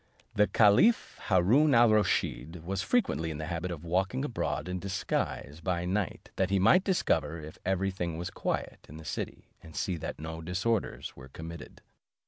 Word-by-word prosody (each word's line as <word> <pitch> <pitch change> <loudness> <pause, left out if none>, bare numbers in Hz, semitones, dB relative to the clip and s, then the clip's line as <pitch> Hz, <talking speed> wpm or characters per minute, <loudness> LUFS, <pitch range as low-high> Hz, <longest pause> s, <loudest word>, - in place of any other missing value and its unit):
The 105 0 +4
caliph 110 - +4
Haroon 120 - +4
al 120 0 +7
Rusheed 90 -6 0
was 95 +2 -2
frequently 190 - +1
in 80 - -4
the 75 - -4
habit 85 +2 -3
of 85 -2 -6
walking 95 +10 0
abroad 115 - -2
in 90 0 -3
disguise 90 -5 -3
by 90 -2 -1
night, 95 0 -2
that 95 -1 +2
he 100 - +2
might 180 - +5
discover 85 - +1
if 75 0 -10
every 95 +1 +1
thing 85 -3 -3
was 85 +1 -4
quiet - - -3
in 75 - -9
the 80 - -11
city, - - -5
and 80 - -13
see 90 -3 -1
that - - -5
no 80 +1 -6
disorders 95 +6 -1
were 65 0 -12
committed. 80 +3 -9
90 Hz, 175 wpm, -30 LUFS, 80-105 Hz, -, al